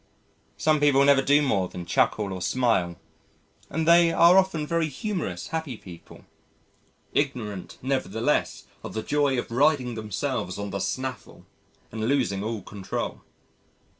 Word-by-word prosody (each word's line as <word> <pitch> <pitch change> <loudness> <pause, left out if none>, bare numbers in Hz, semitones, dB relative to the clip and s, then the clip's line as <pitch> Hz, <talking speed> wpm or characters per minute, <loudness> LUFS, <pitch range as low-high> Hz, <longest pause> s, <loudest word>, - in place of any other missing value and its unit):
Some 155 -1 +2
people 140 -1 +4
never 140 -1 +5
do 145 +2 +4
more 100 -9 +1
than 90 - -7
chuckle 100 +3 +1
or 95 - -6
smile 105 -8 +1 0.7
and 160 +2 -2
they 170 0 +6
are 170 +2 +6
often 185 -5 +2
very 165 0 0
humorous 140 - -4
happy 160 -7 -4
people, 85 -5 -13 0.9
ignorant 110 -10 -2
nevertheless 135 0 -1 0.2
of - - -7
the 110 - -2
joy 145 -2 +1
of 120 - -4
riding 130 -1 +2
themselves 110 -2 -3
on 100 -1 -5
the 100 - -3
snaffle 130 +3 -5 0.5
and 110 0 -3
losing 120 -8 0
all 110 -2 -4
control. 100 -1 -5
130 Hz, 135 wpm, -25 LUFS, 105-150 Hz, 0.9 s, they